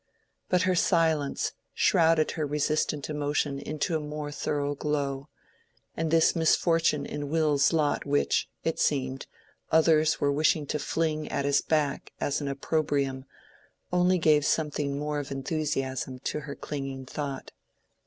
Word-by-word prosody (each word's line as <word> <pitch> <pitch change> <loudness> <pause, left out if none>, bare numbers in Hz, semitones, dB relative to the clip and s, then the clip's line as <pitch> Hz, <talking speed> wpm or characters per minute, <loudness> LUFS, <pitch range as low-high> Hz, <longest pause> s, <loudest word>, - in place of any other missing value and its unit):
But 180 0 +3
her 185 0 +2
silence 160 -5 +1 0.2
shrouded 160 -1 +3
her 155 - -3
resistant 150 0 0
emotion 145 -1 -1
into 155 +3 -2
a - - +1
more 150 0 -5
thorough 145 0 -2
glow; 140 -1 -2 0.7
and 165 0 -1
this 165 +2 +4
misfortune 165 -2 +2
in 145 -1 -5
Will's 150 -3 +3
lot 155 -3 +1
which, 145 0 +1
it 165 - -1
seemed, 135 -2 0 0.4
others 160 -1 +4
were 140 - +2
wishing 150 +1 +2
to 150 - -2
fling 155 0 -1
at 140 -1 -1
his 140 0 +3
back 150 -3 -1
as 145 - -1
an 145 - -3
opprobrium, 140 -1 -1 0.7
only 180 +1 +3
gave 155 -3 +4
something 145 -2 0
more 150 0 -2
of 145 - -6
enthusiasm 135 -2 -2
to - - -2
her 140 -1 -7
clinging 135 -2 -5
thought. 140 0 -5
150 Hz, 140 wpm, -28 LUFS, 140-155 Hz, 0.7 s, this